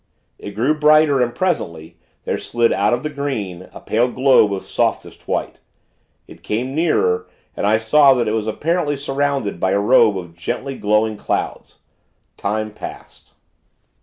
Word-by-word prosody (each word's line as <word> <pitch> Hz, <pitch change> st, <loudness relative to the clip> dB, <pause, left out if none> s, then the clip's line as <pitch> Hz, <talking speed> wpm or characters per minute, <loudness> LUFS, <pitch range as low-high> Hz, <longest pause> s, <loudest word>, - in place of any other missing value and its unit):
It 100 Hz, -1 st, -8 dB
grew 125 Hz, +8 st, +2 dB
brighter; 150 Hz, -2 st, +4 dB
and, 120 Hz, -1 st, -1 dB
presently, 85 Hz, -, -3 dB, 0.3 s
there -, -, -2 dB
slid 120 Hz, -1 st, +1 dB
out 105 Hz, +1 st, +1 dB
of 120 Hz, +1 st, -1 dB
the 150 Hz, -, -2 dB
green, 110 Hz, -11 st, -4 dB
a -, -, -11 dB
pale 120 Hz, +3 st, +1 dB
globe 130 Hz, -5 st, +4 dB
of 95 Hz, -1 st, -4 dB
softest -, -, -2 dB
white. -, -, -3 dB, 0.7 s
It -, -, -15 dB
came 125 Hz, +5 st, -3 dB
nearer, 440 Hz, -, +1 dB, 0.3 s
and -, -, -1 dB
I 110 Hz, +1 st, +4 dB
saw 135 Hz, +5 st, +5 dB
that 120 Hz, -2 st, 0 dB
it -, -, 0 dB
was 110 Hz, -1 st, -2 dB
apparently 150 Hz, +4 st, -1 dB
surrounded 140 Hz, -7 st, -2 dB
by 95 Hz, +2 st, +1 dB
a 100 Hz, -, +2 dB
robe 110 Hz, -1 st, +4 dB
of 85 Hz, -2 st, -8 dB
gently 125 Hz, +10 st, -4 dB
glowing 105 Hz, 0 st, +1 dB
clouds. -, -, -4 dB, 0.6 s
Time 110 Hz, +1 st, -3 dB
passed.... -, -, -11 dB
120 Hz, 160 wpm, -19 LUFS, 105-140 Hz, 0.7 s, saw